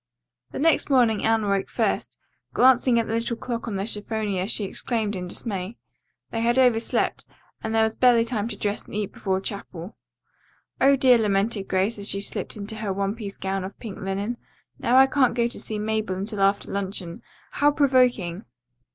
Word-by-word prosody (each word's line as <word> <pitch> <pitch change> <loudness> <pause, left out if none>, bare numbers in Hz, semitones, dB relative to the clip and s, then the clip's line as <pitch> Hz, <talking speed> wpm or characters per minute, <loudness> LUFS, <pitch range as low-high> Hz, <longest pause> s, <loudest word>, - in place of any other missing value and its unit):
The - - -7
next 320 +1 +2
morning 240 -6 +3
Anne 225 0 +2
awoke 200 -1 0
first. - - -1 0.4
Glancing 255 -1 +5
at 230 - +2
the 225 - -4
little 230 +1 -1
clock 235 -1 -5
on 215 - -3
the 195 +1 -2
chiffonier 210 -3 -2
she 220 -1 0
exclaimed 215 +1 -2
in 180 -1 -5
dismay. 195 +2 -5 0.5
They 225 - -2
had 235 +2 +2
overslept, 245 -3 +2 0.4
and 220 0 -2
there 225 - +4
was 220 0 +1
barely 240 -2 +4
time 225 -3 -2
to 215 -3 -6
dress 205 0 -2
and - - -10
eat 210 -1 -2
breakfast - - -31
before 190 -1 +1
chapel. 190 -2 -6 0.9
"Oh, 275 +1 +6
dear," 255 -3 +5
lamented 205 -1 0
Grace 195 +4 0
as 200 - -2
she 195 - 0
slipped 200 - -2
into 210 +2 -6
her 215 -2 -3
one 195 +1 -1
piece 210 -3 -7
gown 195 0 -2
of 195 +2 -8
pink 220 -5 -8
linen, 200 +5 -3 0.4
"now 245 +2 +3
I 265 - +9
can't 265 -3 +2
go 235 -1 +2
to 235 - -4
see 215 - -4
Mabel 215 -2 -1
until 200 +2 -3
after 195 +1 +1
luncheon. 190 -3 -4 0.3
How 290 - +3
provoking!" 250 - +2
215 Hz, 190 wpm, -24 LUFS, 195-235 Hz, 0.9 s, I